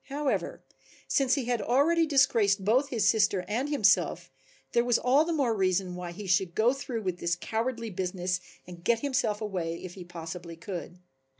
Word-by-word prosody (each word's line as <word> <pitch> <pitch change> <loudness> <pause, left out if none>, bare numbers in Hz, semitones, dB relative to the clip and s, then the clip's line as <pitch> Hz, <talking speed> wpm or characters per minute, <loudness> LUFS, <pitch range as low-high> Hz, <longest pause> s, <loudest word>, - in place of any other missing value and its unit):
However, 285 0 -2 0.4
since 270 -1 +2
he 275 -4 -2
had 240 -2 0
already 310 +9 +3
disgraced 220 -9 +3
both 255 +7 +3
his 225 -5 +1
sister 205 -4 +2
and 245 +7 -1
himself 215 -10 +2 0.4
there 235 - +3
was 245 -1 +3
all 270 +5 +3
the 340 - -2
more 270 -8 +1
reason 185 -2 0
why 180 -1 -6
he 200 +4 -8
should 185 -2 +1
go 235 +4 +3
through 250 -5 -5
with 180 -2 -3
this 170 0 0
cowardly 230 +2 -3
business 180 0 -2 0.3
and 175 -1 -11
get 230 +3 +2
himself 255 -7 0
away 175 -6 -3
if 180 -1 -7
he 185 - -9
possibly 170 0 -8
could. 175 +1 -7
210 Hz, 180 wpm, -28 LUFS, 180-255 Hz, 0.4 s, already